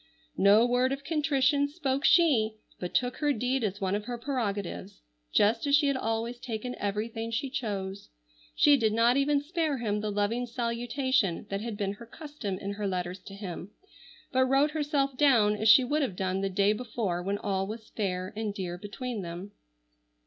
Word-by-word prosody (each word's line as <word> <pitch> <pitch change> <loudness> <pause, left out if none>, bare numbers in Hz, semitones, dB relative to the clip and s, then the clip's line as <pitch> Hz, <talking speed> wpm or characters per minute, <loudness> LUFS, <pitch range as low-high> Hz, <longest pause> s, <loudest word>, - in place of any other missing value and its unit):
No 205 +4 +6
word 250 +1 +2
of 275 +1 -3
contrition 285 -2 +2
spoke 285 -3 -2
she, 240 -11 +4 0.2
but 180 - -5
took 250 0 +1
her 295 -1 +1
deed 250 0 0
as 200 -1 -2
one 190 -2 -1
of 205 0 -2
her 245 0 -4
prerogatives, 210 - -4 0.3
just 225 +6 +3
as 280 - +5
she 290 0 +3
had 280 -1 +2
always 230 0 -2
taken 245 0 -4
everything 220 +3 -3
she 230 +4 -2
chose. 200 -7 -4 0.5
She 290 -1 +6
did 220 -4 +1
not 230 +2 +4
even 280 +1 +2
spare 315 -2 -1
him 210 -3 -1
the 215 - -2
loving 210 +4 0
salutation 235 -3 -1
that 195 0 -2
had 225 -2 -5
been 200 -2 -1
her 230 +3 -12
custom 290 - -6
in 200 +1 -5
her 200 0 -3
letters 180 0 -3
to 195 - -9
him, 190 -2 -7 0.6
but 260 0 +3
wrote 270 +3 +3
herself 290 -3 0
down 230 -8 +4
as 215 +1 +2
she 255 +4 +8
would 295 +5 0
have 250 -10 -1
done 190 0 -1
the 195 - 0
day 200 +2 +3
before 215 -6 -3
when 200 +3 -1
all 195 -2 -1
was 220 +1 -8
fair 185 -3 -3
and 215 -2 -3
dear 180 -2 -4
between 220 +3 -5
them. 175 +3 -7
225 Hz, 185 wpm, -29 LUFS, 200-265 Hz, 0.6 s, she